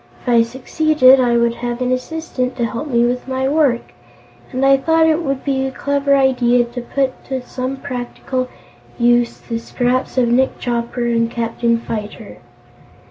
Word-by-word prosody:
If - - -4
I 235 -1 +5
succeeded, 260 +3 +3
I 240 -2 +3
would 235 0 +2
have 240 0 -4
an 250 0 -1
assistant 255 -1 -3
to 240 - 0
help 230 +6 -4
me 240 -3 +2
with 250 +1 -2
my 260 0 -1
work, 280 -5 +1 0.6
and 260 +2 0
I 275 0 +6
thought 320 +4 +2
it 320 +1 +2
would 275 -4 -2
be 270 -2 0
a 265 - -2
clever 280 +1 +1
idea 245 -3 +3
to 240 +1 -7
put 265 +2 -2
to 265 -1 -3
some 255 +2 -4
practical 255 -1 -4 0.5
use 240 0 +2
the 230 -1 -5
scraps 250 +2 -1
of 250 -2 +3
Nick 255 +3 +2
Chopper 240 0 -2
and 230 -1 +1
Captain 235 0 0
Fyter. 220 -2 -7
255 Hz, 170 wpm, -18 LUFS, 235-270 Hz, 0.6 s, I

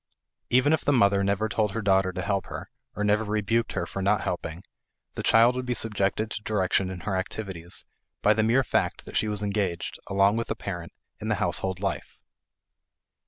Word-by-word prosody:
Even 130 +5 +4
if 160 - +1
the - - +2
mother 100 -6 +4
never 100 +2 +1
told 110 -2 0
her 115 - -2
daughter 95 -1 +3
to 95 0 -4
help 100 +1 -1
her, - - -7 0.2
or 105 - -2
never 105 +1 +3
rebuked 110 +2 0
her 85 -3 -1
for 95 - -5
not 100 +2 +2
helping, 85 0 -4 0.5
the - - -4
child 115 +2 +5
would 130 0 -3
be 125 - 0
subjected 105 0 0
to - - -4
direction 95 -3 +1
in 90 -2 -6
her 100 -2 -2
activities 95 -2 -4 0.4
by 105 - +6
the 110 - +1
mere 115 +5 +3
fact - - -1
that - - -9
she 110 - +2
was 105 -1 -1
engaged, 100 -4 -2
along 100 +2 +3
with 115 - -2
the - - -2
parent, 85 -4 -6 0.3
in - - -5
the - - +2
household 95 -1 -1
life. 100 0 -3
100 Hz, 200 wpm, -27 LUFS, 95-110 Hz, 0.5 s, by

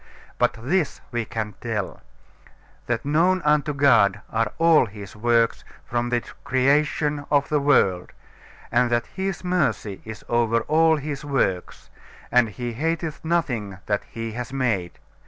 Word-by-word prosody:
But - - +3
this 155 +7 0
we 120 -2 -2
can 105 -1 -4
tell, 110 -5 -3 0.9
that 120 0 -1
known 170 +6 +3
unto 150 0 +3
God 115 -9 +4
are 115 -1 0
all 165 -6 +5
His 100 -1 -10
works 115 +1 +2 0.2
from 120 0 -1
the 120 -1 0 0.2
creation 145 +3 +1
of 145 -1 +2
the 150 - +2
world; 95 -11 +2 0.6
and 125 - +3
that 120 0 +1
His 190 -1 -3
mercy 135 - -1
is 110 -1 -9
over 115 -1 +2
all 160 +5 +3
His 145 -1 -5
works, 125 -11 -2 0.4
and 125 -2 +4
He 120 +4 -5
hateth 160 +4 -2
nothing 125 - -1
that 105 -1 0
He 115 0 -5
has 120 +2 -6
made. 115 -10 -1
120 Hz, 140 wpm, -24 LUFS, 110-150 Hz, 0.9 s, all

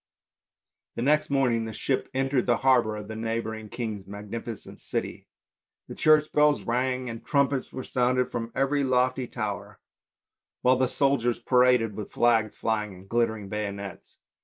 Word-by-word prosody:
The 115 - -2
next 150 +3 +3
morning 125 -5 +2
the 110 - -6
ship 130 +4 -1
entered 135 -1 +1
the 120 -1 +3
harbour 120 -5 +4
of 105 -1 -7
the 110 - -6
neigh 115 +1 -1
bouring 110 -1 -6
king's 105 -5 -5
magnificent 105 +2 -7
city. - - -4 0.6
The - - -5
church 155 -1 +4
bells 150 0 +3
rang 125 +1 -1
and 115 -1 -6
trumpets 140 -2 +1
were 130 - -6
sounded 125 0 +1
from 115 -1 -4
every 140 +1 +1
lofty 130 0 +1
tower, 105 -6 -5 0.8
while 125 +1 +5
the 130 0 +2
soldiers 135 -4 +1
paraded 125 -3 +3
with 105 - -6
flags 115 -3 +2
flying 105 -3 -1
and 95 +1 -14
glittering 110 -2 0
bayonets. 100 -2 -6
120 Hz, 155 wpm, -27 LUFS, 110-130 Hz, 0.8 s, while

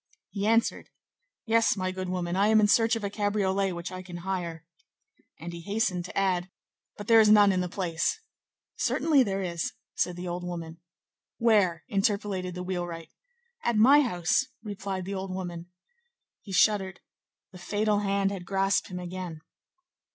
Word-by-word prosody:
He 200 0 -2
answered:— 230 +1 +1 0.6
"Yes, 225 -2 +3
my 185 -1 -1
good 185 0 -5
woman; 180 -1 -2
I 200 +2 +3
am 220 0 +5
in 210 - +4
search 225 +2 +4
of 225 - -5
a 200 - -1
cabriolet 200 -2 0
which 170 +1 -6
I 185 0 -6
can 180 -1 -9
hire." 170 -4 -4 0.7
And 170 +2 -7
he 170 - -7
hastened 200 -2 -1
to - - -8
add:— 185 -2 +1 0.5
"But 205 - -7
there 225 +1 +6
is 215 -1 +6
none 205 -1 +7
in 185 -1 +1
the 180 - -3
place." 175 - -1 0.6
"Certainly 305 -4 +3
there 195 -5 0
is," 170 -2 -3 0.2
said 180 - -1
the 180 +1 -6
old 175 +1 -4
woman. 170 -2 -6 0.6
"Where?" 205 -8 +3
interpolated 195 -2 -1
the 180 - -5
wheelwright. 175 -3 -5 0.5
"At 235 - +1
my 270 +7 +7
house," 180 - +1 0.2
replied 195 -3 -5
the 195 - -4
old 190 -1 -4
woman. 175 -2 -6 0.7
He 200 - -11
shuddered. 190 -1 +2 0.5
The 180 - -12
fatal 205 +3 0
hand 200 -1 0
had 195 -3 -5
grasped 195 +2 +1
him 180 - -7
again. 180 -2 -6
190 Hz, 165 wpm, -28 LUFS, 180-205 Hz, 0.7 s, none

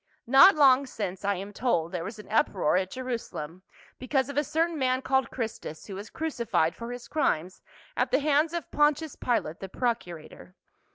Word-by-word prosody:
Not 270 +10 +8
long 275 -2 +5
since, 195 -6 -5
I 200 0 +1
am 200 +3 -7
told, 175 -9 0
there 180 -3 -3
was 215 +5 -7
an 210 - -11
uproar 190 -7 +2
at 185 0 +1
Jerusalem 230 -10 -5 0.4
because 265 +1 0
of 285 - -6
a 295 - +2
certain 325 +2 -1
man 260 0 +1
called 265 -2 +1
Christus, 220 -10 -6
who 200 - -8
was 200 +3 -7
crucified 235 - -1
for 235 +1 -7
his 245 0 -8
crimes 185 - -1 0.3
at - - +1
the - - +3
hands 300 +2 +2
of 340 -3 -5
Pontius 295 0 +1
Pilate, 225 -9 -1
the 195 - -7
procurator. 180 -7 -4
240 Hz, 180 wpm, -27 LUFS, 190-280 Hz, 0.4 s, Not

